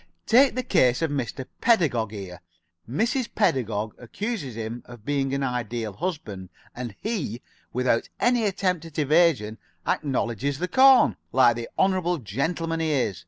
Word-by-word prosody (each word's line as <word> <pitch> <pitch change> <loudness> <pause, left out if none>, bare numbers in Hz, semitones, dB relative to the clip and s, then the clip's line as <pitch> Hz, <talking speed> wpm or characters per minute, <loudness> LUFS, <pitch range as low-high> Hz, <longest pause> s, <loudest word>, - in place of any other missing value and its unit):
Take 260 +3 +5
the 255 - -1
case 130 - +3
of 160 - 0
Mr. 130 -2 -3 0.2
Pedagog 150 - +3
here. 95 -4 -8 0.5
Mrs. 235 - 0
Pedagog 115 - 0
accuses 165 - -5
him 115 +1 -5
of 120 -3 -13
being 140 -2 0
an 140 0 -1
Ideal 120 -4 -3
Husband, 110 - -5 0.3
and 120 -4 -6
he, 175 - -3 0.3
without 125 -2 0
any 240 -2 +2
attempt 185 -4 0
at 160 -3 -11
evasion, 150 -8 +2 0.3
acknowledges 135 -1 -1
the 180 +4 -2
corn, 260 +7 +6
like 125 -3 +5
the 115 0 -6
honorable 185 -2 +2
gentleman 165 - -2
he 160 -1 0
is. 125 - 0
140 Hz, 145 wpm, -25 LUFS, 115-180 Hz, 0.5 s, corn